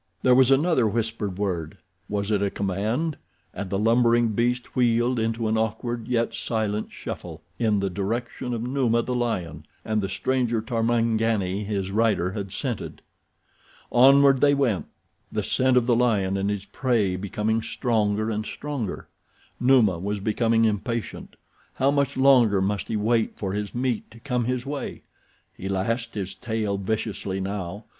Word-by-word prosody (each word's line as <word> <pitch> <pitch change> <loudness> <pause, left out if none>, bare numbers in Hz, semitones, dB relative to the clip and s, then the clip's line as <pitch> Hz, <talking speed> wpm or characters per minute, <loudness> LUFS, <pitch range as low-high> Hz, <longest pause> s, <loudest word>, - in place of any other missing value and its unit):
There 125 - +5
was 130 0 +6
another 135 -3 +3
whispered 110 -3 -2
word—was 100 +2 -4
it 105 -2 +2
a 100 - +1
command?—and 100 - -4
the 95 - -1
lumbering 115 +2 +3
beast 120 +3 -1
wheeled 120 0 +2
into 115 0 -1
an 110 0 +1
awkward, 110 +1 -2
yet 115 -2 0
silent 110 -2 -2
shuffle, - - -7 0.2
in 110 -4 +2
the 100 - 0
direction 115 +6 -3
of 115 - -4
Numa, 120 -2 +1
the 125 - -3
lion, 90 -11 -2 0.2
and 110 -1 0
the 95 - -3
stranger 120 +4 0
Tarmangani 115 -3 0
his 100 -2 -2
rider 105 -4 +2
had 100 -1 -5
scented. 120 +3 -4 0.9
Onward 135 +2 +6
they 145 0 +5
went, 125 -9 0 0.4
the - - -1
scent 130 0 +2
of 125 - +3
the 120 -1 +3
lion 105 -6 +2
and 100 +1 0
his 100 -1 -3
prey 115 -8 0
becoming 105 +4 -1
stronger 110 -2 0
and 105 0 -2
stronger. 135 -4 -5 0.5
Numa 120 -9 +4
was 100 +3 -2
becoming 115 +2 +2
impatient. 110 +2 -3 0.4
How 135 +2 +2
much 140 -1 0
longer 125 -7 +5
must 100 +1 -1
he 110 - -1
wait 110 +1 +1
for 95 -2 -3
his 105 +1 -4
meat 125 -2 -1
to 115 - -15
come 125 -1 -1
his 125 0 -2
way? 145 0 -5 0.5
He 95 - -6
lashed 115 +5 -2
his 95 -2 -3
tail 105 -1 -2
viciously 100 -1 -2
now. 100 +1 -4
110 Hz, 150 wpm, -25 LUFS, 100-120 Hz, 0.9 s, was